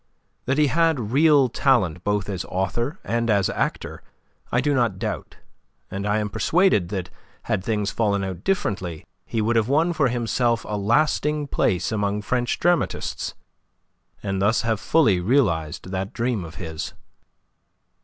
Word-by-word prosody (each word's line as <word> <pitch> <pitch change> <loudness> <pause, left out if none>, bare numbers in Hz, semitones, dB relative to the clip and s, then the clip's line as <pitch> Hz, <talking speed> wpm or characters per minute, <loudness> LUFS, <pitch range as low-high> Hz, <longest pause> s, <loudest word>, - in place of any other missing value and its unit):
That 130 +3 0
he 150 - +5
had 145 -6 +1
real 145 -1 +5
talent 105 - +1
both 105 -1 0
as 95 -4 -3
author 120 - -2
and 115 0 -1
as 100 -3 +2
actor - - -3 0.5
I 120 - +2
do 145 +3 +1
not 120 -7 +1
doubt, - - -4 0.6
and 100 +1 -3
I 105 +1 +2
am 105 -1 -1
persuaded 130 - +2
that 95 -3 -4 0.3
had 95 - -1
things 105 -2 -1
fallen 100 -3 0
out 95 -2 -5
differently 95 - -2 0.2
he 115 - -1
would 115 +2 +1
have 115 +1 +2
won 160 +5 +2
for 150 -4 +2
himself 120 -1 0
a 105 - -2
lasting 145 +7 +1
place 95 -6 +1
among 105 -1 -1
French 120 +3 0
dramatists, 175 0 0 0.9
and 95 -2 -2
thus 105 +4 +2 0.2
fully 125 - +3
have 90 +1 -4
realized 95 - +1
that 95 +1 -3
dream 115 -4 -1
of 80 - -10
his. 80 -3 -5
110 Hz, 155 wpm, -23 LUFS, 95-135 Hz, 0.9 s, he